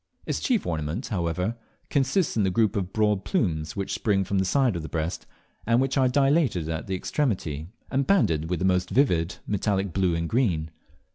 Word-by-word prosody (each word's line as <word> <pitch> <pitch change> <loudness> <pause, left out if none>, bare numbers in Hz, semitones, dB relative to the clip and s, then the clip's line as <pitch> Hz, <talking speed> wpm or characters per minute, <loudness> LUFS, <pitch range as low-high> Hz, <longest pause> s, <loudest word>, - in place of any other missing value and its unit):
Its - - -1
chief 245 -5 +1
ornament, 80 - -3
however, 90 +2 -1 0.4
consists 140 +5 +1
in 110 - +2
the 95 - +2
group 110 +3 +2
of 95 -2 -2
broad 105 -2 +1
plumes 80 - -1
which 100 -2 -3
spring 100 -3 +1
from 95 +1 -1
the 95 - +1
sides 130 +1 +2
of 85 - -3
the 80 - -7
breast, 80 +1 -3 0.4
and 115 +1 +4
which 135 0 0
are 130 -2 +3
dilated 135 - +2
at 80 +2 -4
the 95 - -1
extremity, 90 - -2 0.2
and 135 0 0
banded 80 - +2
with 90 - 0
the 90 - -1
most 90 -1 +2
vivid 90 - +2
metallic 100 -2 -1
blue 95 -3 +1
and 85 0 -1
green. 85 -9 0
95 Hz, 195 wpm, -26 LUFS, 85-125 Hz, 0.4 s, and